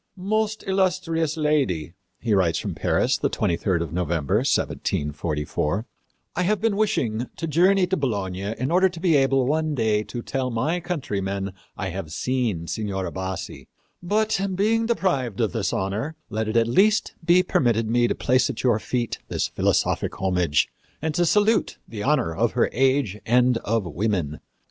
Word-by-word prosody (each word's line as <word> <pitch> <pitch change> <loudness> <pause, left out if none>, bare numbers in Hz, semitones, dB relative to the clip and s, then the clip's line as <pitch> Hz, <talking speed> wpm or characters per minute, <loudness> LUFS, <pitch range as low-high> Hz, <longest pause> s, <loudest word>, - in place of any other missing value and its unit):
"Most 215 +3 -1
Illustrious 180 -5 0
Lady," 135 - 0 0.3
he 115 -2 0
writes 90 -4 +2
from - - -3
Paris, - - +1
the - - +1
23d 85 0 0
of 85 -2 -4
November, 85 +1 0
1744, 75 - -1 0.5
"I 180 - 0
have 200 +3 +1
been 225 -1 +1
wishing 125 - 0
to - - -4
journey 180 +5 +4
to 185 +1 0
Bologna 100 - -2
in 130 +4 -2
order 185 +2 +4
to 175 -2 -9
be 170 -3 +3
able 135 -1 +3
one 155 +2 0
day 110 -4 +2
to 120 -1 -6
tell 130 -1 -2
my 145 +9 0
countrymen 100 - -3 0.2
I 95 -2 -3
have 85 -3 -6
seen 110 - -1
Signora 95 0 -3
Bassi; 95 0 -5 0.3
but, 210 +3 +1
being 225 +4 +2
deprived 140 - 0
of 110 -3 +1
this 110 -4 -1
honor, 105 +11 -2 0.2
let 110 0 -1
it 110 +2 0
at 115 - +4
least 205 - +3
be 175 +2 +5
permitted 115 - +1
me 120 +1 +3
to - - -1
place 130 0 +2
at - - -4
your 120 -4 +3
feet 120 +1 -2
this - - -1
philosophic - - 0
homage 90 -5 +2 0.3
and 160 0 -2
to 175 +2 +2
salute 210 +3 +2
the 105 -3 -7
honor 130 - +1
of - - +1
her - - +2
age 130 -5 +1
and 125 0 +3
of 115 -2 -1
women. 85 -3 -2
120 Hz, 165 wpm, -24 LUFS, -, 0.5 s, be